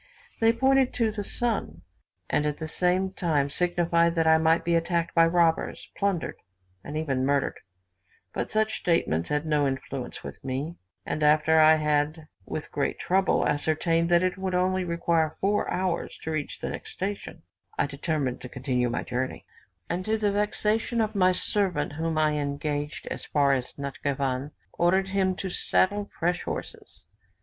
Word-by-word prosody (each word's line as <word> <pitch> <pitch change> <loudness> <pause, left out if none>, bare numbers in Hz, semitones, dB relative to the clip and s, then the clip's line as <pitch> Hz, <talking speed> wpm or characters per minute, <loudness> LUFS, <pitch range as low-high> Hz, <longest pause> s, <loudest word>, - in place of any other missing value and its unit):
They 225 0 +5
pointed 265 +2 +2
to 225 -2 +1
the 210 -1 -4
sun, 200 - -2 0.4
and 150 - +1
at 150 - -2
the 160 - -5
same 180 +3 +1
time 150 -7 0
signified 170 0 +2
that 165 -1 +2
I 160 0 +6
might 160 +1 +3
be 170 - +2
attacked 170 0 0
by 165 -1 +5
robbers, 165 -1 +1
plundered, 195 -4 -1 0.5
and 150 +2 -5
even 135 -5 -1
murdered; 140 0 0 0.7
but - - -2
such 220 0 0
statements 85 - +1
had 150 +1 0
no 150 -2 +2
influence 135 -1 -5
with - - -9
me; 135 +5 -3 0.3
and 155 - -3
after 155 +1 +4
I 155 0 +7
had 150 +1 0 0.2
with 155 - -5
great 145 - -1
trouble 190 +1 +2
ascertained 165 +3 +1
that 175 0 +4
it 185 +1 -1
would 190 -1 -2
only 185 +1 +1
require 170 -2 0
four 205 +2 +1
hours 180 -1 -2
to 160 - -3
reach 155 -2 -4
the - - -3
next - - -6
station, 195 -4 -5 0.3
I - - +2
determined 140 -2 -2
to 125 - -8
continue 125 -2 -1
my 120 - -2
journey; 130 +1 -3 0.4
and 175 +2 -2
to 220 +1 +1
the 210 -2 +1
vexation 210 +3 0
of 220 -1 +1
my 185 -3 +4
servant, 180 -5 0
whom 160 +1 -2
I 155 -1 +3
had 150 -1 -1
engaged 145 +1 -3
as - - -4
far 140 -2 +2
as 130 -2 -2
Natschivan, 140 -1 -2 0.2
ordered 190 +3 +2
him 190 -1 +1
to 190 0 -4
saddle 205 +3 +1
fresh 175 +1 0
horses. - - -7
165 Hz, 170 wpm, -27 LUFS, 145-185 Hz, 0.7 s, I